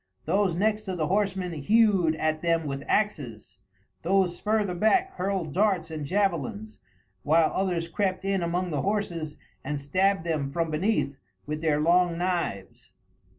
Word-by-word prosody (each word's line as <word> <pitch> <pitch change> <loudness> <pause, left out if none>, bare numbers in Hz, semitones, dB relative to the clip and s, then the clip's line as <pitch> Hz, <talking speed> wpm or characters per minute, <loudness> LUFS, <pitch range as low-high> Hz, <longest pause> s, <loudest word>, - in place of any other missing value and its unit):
Those 195 -4 +1
next 215 +3 +1
to 190 -2 -3
the 160 -3 -1
horsemen 190 0 0
hewed 185 +1 +3
at 155 0 -1
them 165 -1 +1
with 140 -1 -4
axes, 115 - -2 0.4
those 180 0 +1
further 210 -3 0
back 355 - +2
hurled 185 -5 -2
darts 190 -4 +1
and 155 -3 -5
javelins, 205 +4 -1 0.4
while 160 +4 +3
others 180 -3 -1
crept 190 +2 -2
in 195 -1 0
among 175 +1 -1
the 145 -3 -1
horses 180 -7 -2 0.3
and 145 +1 -3
stabbed 185 +6 +1
them 155 -5 -1
from 165 +1 -1
beneath 155 -4 0 0.3
with 150 +1 -4
their 155 -2 +1
long 170 +2 +3
knives. 175 - -3
175 Hz, 150 wpm, -27 LUFS, 155-195 Hz, 0.4 s, hewed